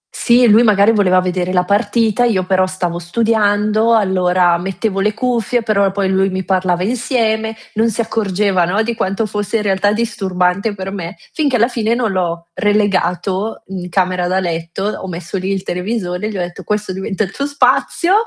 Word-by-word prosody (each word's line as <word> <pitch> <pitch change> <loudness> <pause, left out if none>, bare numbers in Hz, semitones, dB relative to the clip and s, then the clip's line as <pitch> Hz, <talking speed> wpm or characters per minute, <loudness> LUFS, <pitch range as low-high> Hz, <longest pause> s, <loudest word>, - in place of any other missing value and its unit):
Sì, 240 0 +4
lui 220 +1 +6
magari 210 -2 +4
voleva 185 -4 +3
vedere 180 0 -2
la 180 -1 +2
partita, 225 +3 +1
io 195 -6 +1
però 185 0 +2
stavo 180 -2 -3
studiando, 215 +3 +1
allora 180 -4 +2
mettevo 195 +2 -2
le 210 +1 +1
cuffie, 240 -1 0
però 200 -3 +2
poi 195 0 -1
lui 190 0 +2
mi 190 0 -4
parlava 185 -2 0
insieme, 225 -1 -1 0.2
non 225 +2 +2
si 225 - -5
accorgeva, 200 -4 0
no, 195 +6 0
di 235 +1 -2
quanto 195 0 -1
fosse 210 +2 -2
in 215 - -2
realtà 200 0 +1
disturbante 200 -2 -1
per 190 -1 -5
me, 180 -2 -6 0.2
finché 290 -5 0
alla 230 -1 +3
fine 230 -2 -1
non 235 -4 0
l'ho 170 -2 -2
relegato, 205 0 0
in 180 -2 -6
camera 180 -1 0
da 185 +1 +1
letto, 170 0 -3
ho 205 -2 -3
messo 175 +1 -5
lì 190 +1 -2
il 195 -1 -2
televisore, 180 0 -3
e - - -3
gli 210 - -5
ho - - -2
detto: 175 0 -6
"Questo 210 -2 -2
diventa 190 +2 -2
il 195 - -5
tuo 280 +7 -3
spazio, 325 +5 +1
195 Hz, 185 wpm, -16 LUFS, 185-220 Hz, 0.2 s, lui